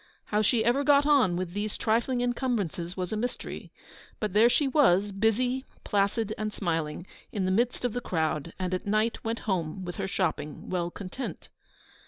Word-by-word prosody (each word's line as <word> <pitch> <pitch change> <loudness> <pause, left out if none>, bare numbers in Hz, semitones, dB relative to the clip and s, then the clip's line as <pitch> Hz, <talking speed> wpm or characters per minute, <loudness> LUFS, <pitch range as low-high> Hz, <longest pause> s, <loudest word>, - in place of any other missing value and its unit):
How 210 0 +1
she 220 +1 +2
ever 250 +4 +3
got 285 0 +5
on 275 -12 +4
with 175 -1 -3
these 205 +1 -2
trifling 240 +3 +1
incumbrances 225 - -1
was 180 +2 -2
a - - 0
mystery; 245 +4 -4 0.5
but 210 -4 -2
there 220 +3 +6
she 285 +3 +3
was, 205 - +4
busy, 235 +6 +1 0.2
placid, 205 +2 +1
and 215 0 -1
smiling, 165 -4 -2 0.3
in 195 -3 -1
the 185 - +1
midst 240 +5 +1
of 245 - 0
the 245 - -2
crowd, 160 -5 -1
and 185 -1 -2
at 185 - -3
night 215 +3 +1
went 225 +1 -2
home 185 -2 -2
with 175 - -6
her - - -2
shopping 160 -6 -2
well 175 -2 0
content. 200 +8 -7
210 Hz, 180 wpm, -28 LUFS, 180-240 Hz, 0.5 s, there